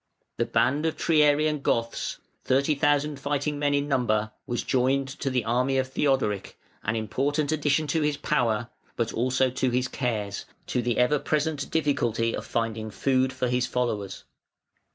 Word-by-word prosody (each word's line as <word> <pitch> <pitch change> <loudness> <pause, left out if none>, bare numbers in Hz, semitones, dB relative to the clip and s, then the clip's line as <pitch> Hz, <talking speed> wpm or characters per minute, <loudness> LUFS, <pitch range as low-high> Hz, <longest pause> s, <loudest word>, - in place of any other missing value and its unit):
The - - +1
band 145 +5 +2
of 160 - -2
Triarian 150 -1 +3
Goths, 115 -3 -1 0.3
thirty 140 +3 +2
thousand 145 0 +1
fighting 145 +1 -1
men 145 -1 +2
in 140 0 0
number, 110 -6 +1 0.2
was 120 -2 -2
joined 135 +1 +1
to 135 - -1
the 125 -3 0
army 125 +3 +1
of 130 0 0
Theodoric, 130 -8 0 0.3
an 110 - -1
important 140 +7 0
addition 155 0 +1
to 160 +2 0
his 150 -1 +1
power, 120 -6 0 0.3
but 115 -1 -1
also 130 +2 +1
to 130 +1 0
his 125 +1 0
cares, 110 -6 -3 0.2
to 125 - -1
the 120 -1 -1
ever 125 +4 +3
present 150 -1 -1
difficulty 120 -7 +1
of - - -6
finding 115 -1 -2
food 130 +3 +1
for 130 -1 -2
his 125 0 +1
followers. 110 -6 -2
130 Hz, 160 wpm, -26 LUFS, 120-145 Hz, 0.3 s, Triarian